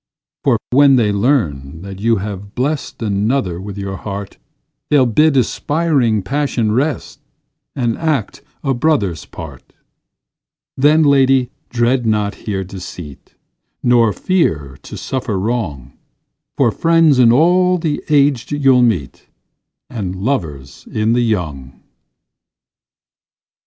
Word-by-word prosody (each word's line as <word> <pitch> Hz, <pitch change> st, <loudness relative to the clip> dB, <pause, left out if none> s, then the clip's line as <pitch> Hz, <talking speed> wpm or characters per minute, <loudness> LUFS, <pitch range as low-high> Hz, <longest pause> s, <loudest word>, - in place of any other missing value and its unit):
For -, -, +3 dB
when 140 Hz, +1 st, +6 dB
they 110 Hz, -5 st, +2 dB
learn 85 Hz, -, -1 dB
that 95 Hz, -1 st, -8 dB
you 115 Hz, +2 st, +2 dB
have 100 Hz, 0 st, -6 dB
blest 135 Hz, -1 st, -3 dB
Another 100 Hz, -3 st, -1 dB
with 100 Hz, 0 st, -8 dB
your 100 Hz, -1 st, -5 dB
heart, 100 Hz, +2 st, -7 dB, 0.5 s
They'll 140 Hz, -3 st, +4 dB
bid 140 Hz, +5 st, +3 dB
aspiring 130 Hz, -, +1 dB
passion 130 Hz, -2 st, -1 dB
rest, 135 Hz, +6 st, -2 dB, 0.6 s
And 120 Hz, -4 st, 0 dB
act 155 Hz, -10 st, -2 dB, 0.2 s
a 135 Hz, -2 st, +1 dB
brother's 120 Hz, -, 0 dB
part; -, -, -11 dB, 1.0 s
Then, 150 Hz, +4 st, +4 dB
lady, 135 Hz, -3 st, +3 dB, 0.2 s
dread 120 Hz, 0 st, +1 dB
not 105 Hz, -1 st, 0 dB
here 95 Hz, -3 st, -4 dB
deceit, 90 Hz, -6 st, -10 dB, 0.5 s
Nor 120 Hz, -3 st, +4 dB
fear 80 Hz, -, -1 dB
to -, -, -9 dB
suffer 125 Hz, -6 st, -3 dB
wrong; 95 Hz, -, -3 dB, 0.6 s
For -, -, +3 dB
friends 165 Hz, -4 st, +3 dB
in 120 Hz, -2 st, +6 dB
all 180 Hz, +7 st, +3 dB
the 160 Hz, -3 st, -2 dB
aged 140 Hz, -4 st, +2 dB
you'll 135 Hz, -3 st, +3 dB
meet, 95 Hz, -, -1 dB, 0.6 s
And 95 Hz, -6 st, -5 dB
lovers 85 Hz, -, -4 dB
in 110 Hz, +1 st, +1 dB
the 120 Hz, -, +2 dB
young. 75 Hz, -, -3 dB
115 Hz, 115 wpm, -17 LUFS, 100-140 Hz, 1.0 s, when